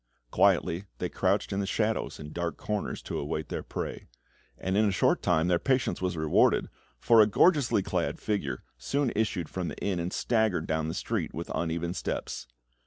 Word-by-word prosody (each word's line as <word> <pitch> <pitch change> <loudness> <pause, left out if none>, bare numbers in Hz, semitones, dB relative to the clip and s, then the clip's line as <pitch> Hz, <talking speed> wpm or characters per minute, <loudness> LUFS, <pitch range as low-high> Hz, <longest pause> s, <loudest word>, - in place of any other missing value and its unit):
Quietly 90 +4 +3
they - - -2
crouched - - 0
in 95 - -1
the 100 - -1
shadows 110 +2 -1
and 75 0 -8
dark 85 -1 -3
corners 105 -1 -3
to - - -3
await 75 +1 -3
their - - -3
prey; - - -5 0.5
and 95 +1 -2
in 105 0 +4
a - - 0
short 95 - +2
time 85 -1 +2
their 90 -1 +3
patience 130 -6 +1
was 90 -2 -1
rewarded, 80 -1 +3 0.3
for 115 - +6
a 105 - +6
gorgeously 135 - +3
clad - - -1
figure 75 -12 -2 0.2
soon 135 - 0
issued 105 -6 0
from 90 +2 -4
the - - -5
inn, 95 -3 -1
and 85 +2 -2
staggered 110 -8 +1
down 80 0 -1
the 80 - -3
street - - -2
with 85 +2 -5
uneven 85 +1 -1
steps. 90 - -4
90 Hz, 185 wpm, -29 LUFS, 80-105 Hz, 0.5 s, for